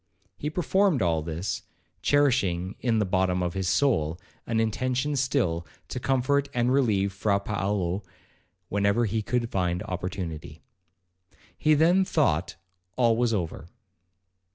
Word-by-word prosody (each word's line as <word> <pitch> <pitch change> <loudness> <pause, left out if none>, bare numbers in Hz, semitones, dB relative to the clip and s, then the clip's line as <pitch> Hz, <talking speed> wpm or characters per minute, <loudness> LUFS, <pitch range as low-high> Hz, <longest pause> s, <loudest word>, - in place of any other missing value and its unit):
He 145 +8 -3
performed 180 - +2
all 80 -2 +1
this, 80 +4 -3 0.4
cherishing 100 -11 +2
in 120 -3 +1
the 105 - +2
bottom 95 -1 +1
of 85 -1 -2
his 95 -2 -1
soul 85 - +1 0.3
an 115 -1 0
intention 130 +6 0
still 120 -11 0 0.3
to - - -4
comfort 135 +2 +1
and 120 +1 +2
relieve 105 -8 +2
Fra 100 0 +1
Paolo, 100 -2 -1 0.7
whenever 100 +4 +2
he 110 +1 -1
could 120 +2 -1
find 90 -2 0
opportunity. 85 -4 -5 0.9
He 155 0 +3
then 175 +5 +4
thought 95 - +1 0.4
all 120 -3 +3
was 120 0 +1
over. 85 -6 -3
105 Hz, 130 wpm, -26 LUFS, 90-130 Hz, 0.9 s, then